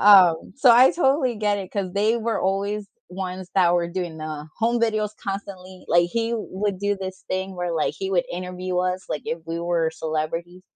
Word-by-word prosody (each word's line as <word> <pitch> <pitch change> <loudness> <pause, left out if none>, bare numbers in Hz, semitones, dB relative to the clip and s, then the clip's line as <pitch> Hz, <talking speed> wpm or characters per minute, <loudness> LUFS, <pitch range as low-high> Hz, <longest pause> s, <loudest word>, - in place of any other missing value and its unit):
um, 185 -5 +6
so 270 -2 +6
I 250 +3 +8
totally 270 -6 +2
get 210 -1 +1
it 190 -2 -6
'cause 190 -3 -3
they 215 +3 +2
were 230 -1 -1
always 200 +2 -1 0.2
ones 185 0 -5
that 175 -2 +4
were 170 -1 +1
doing 175 -2 -4
the 155 -1 -6
home 235 +1 +1
videos 215 -2 +1
constantly, 190 -2 -6
like, 175 0 +4
he 230 +2 -1
would 205 -3 -3
do 205 0 0
this 190 -1 -7
thing 190 +1 -2
where, 175 -1 -2
like, 160 -2 0
he 190 0 -3
would 180 -3 +2
interview 180 0 -3
us, 185 +1 -1
like, 150 - -3
if 165 - -2
we 165 +1 -3
were 170 -1 +1
celebrities. 160 +3 -3
185 Hz, 195 wpm, -24 LUFS, 175-205 Hz, 0.2 s, I